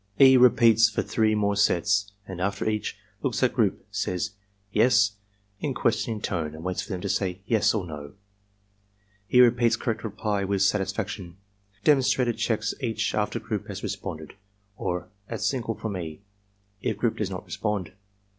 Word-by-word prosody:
E. 130 -1 +9
repeats 115 -3 +6
for - - -1
three 110 -1 +1
more 100 -1 +1
sets 100 +1 +2 0.2
and 90 -2 -6
after 100 +3 -1
each, 105 -1 -2 0.2
looks - - -1
at - - +3
group, - - 0
says 90 0 -2 0.4
"Yes?" 115 -2 +4 0.5
in 140 -4 -2
questioning 115 -2 0
tone 80 -6 -2
and 80 - -9
waits 90 0 -2
for - - -10
them 90 -2 -3
to - - -3
say 95 -1 -1
"Yes" 110 -1 +3
or 100 -4 -1
"No." 75 -3 -8 1.1
He 125 - +6
repeats 120 -1 +4
correct 110 -3 -3
reply 105 -2 -2
with 100 0 +1
satisfaction. 95 -2 -1 0.5
Demonstrator 130 -4 +3
checks 110 -1 -1
each 115 -4 -1
after 105 +2 0
group 110 -1 -4
has 100 -2 -7
responded, 95 -7 -5 0.4
or 90 -3 -3 0.2
at 115 -3 -4
signal 115 -1 -1
from 105 -2 -4
E. 80 -2 -6 0.6
if 110 -1 -1
group 115 +1 0
does 105 -3 -1
not 95 -1 -6
respond. 105 -5 -3
105 Hz, 160 wpm, -26 LUFS, 95-115 Hz, 1.1 s, E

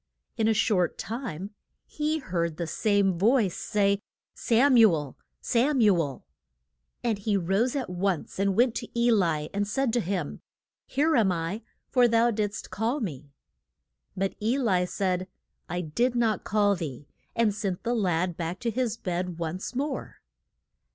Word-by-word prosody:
In 220 -2 +1
a 225 - +4
short 185 -5 +2
time 215 - -5 0.3
he 305 +1 -1
heard 170 - -2
the 170 - -2
same 195 +1 +1
voice 215 -2 +3
say, 200 -1 +1 0.3
Sam 255 +4 +3
u 225 -4 +8
el 150 -5 -3 0.3
Sam 260 +4 +2
u 210 -4 +5
el. 145 -7 -2 0.8
And 225 -4 0
he 205 0 +1
rose 195 - +1
at 270 -3 -2
once 180 0 -2
and 195 -1 +2
went 240 0 +4
to 235 - -5
E 240 0 +4
li, 165 -8 +1
and 200 0 0
said 245 +2 0
to 240 - +3
him, 185 -6 -3 0.5
Here 305 +4 +2
am 215 -6 +4
I, 170 +5 -3 0.3
for 250 -2 +5
thou 230 +1 +3
did'st 205 -2 -3
call 225 +9 -1
me. 150 - -5 0.9
But 195 +1 0
E 230 +5 +1
li 190 -9 +2
said, 185 -1 -1 0.4
I 175 - -2
did 235 +10 0
not 225 -4 +1
call 205 -1 +2
thee, 145 -5 -6 0.3
and 225 -3 +2
sent 195 -3 -3
the 240 +1 0
lad 180 -5 0
back 170 +2 -4
to 235 - 0
his 230 -1 -1
bed 180 -4 -3
once 170 +7 -4
more. 280 +1 -3
205 Hz, 165 wpm, -27 LUFS, 180-235 Hz, 0.9 s, u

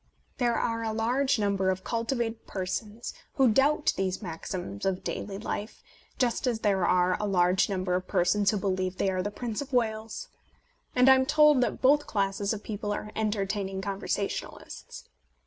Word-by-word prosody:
There 240 -2 +2
are 230 -1 -1
a 220 -1 -2
large 255 +5 +1
number 200 -2 +1
of 190 0 -1
cultivated 230 -1 -2
persons 205 +4 -4 0.2
who 265 -3 +4
doubt 290 +6 +3
these 190 -1 -1
maxims 170 - -6
of 190 -1 -1
daily 195 -1 -4
life, 210 +1 -5 0.3
just 250 0 0
as 230 -3 0
there 195 -4 +2
are 180 0 +3
a 210 - -1
large 185 0 +3
number 185 -2 -1
of 180 0 -1
persons 195 +3 +2
who 210 - +1
believe 185 -2 -1
they 195 - +1
are 185 -1 -1
the 205 - -2
Prince 225 +2 -4
of 285 0 -7
Wales; 225 - -1 0.7
and 250 +1 +5
I 265 - +10
am 260 0 +2
told 300 -2 +5
that 245 - -1
both 290 +3 +4
classes 200 0 0
of 215 -2 -4
people 210 -1 -4
are 210 +1 -4
entertaining 200 -2 -1
conversationalists. 200 0 -4
210 Hz, 170 wpm, -28 LUFS, 190-235 Hz, 0.7 s, I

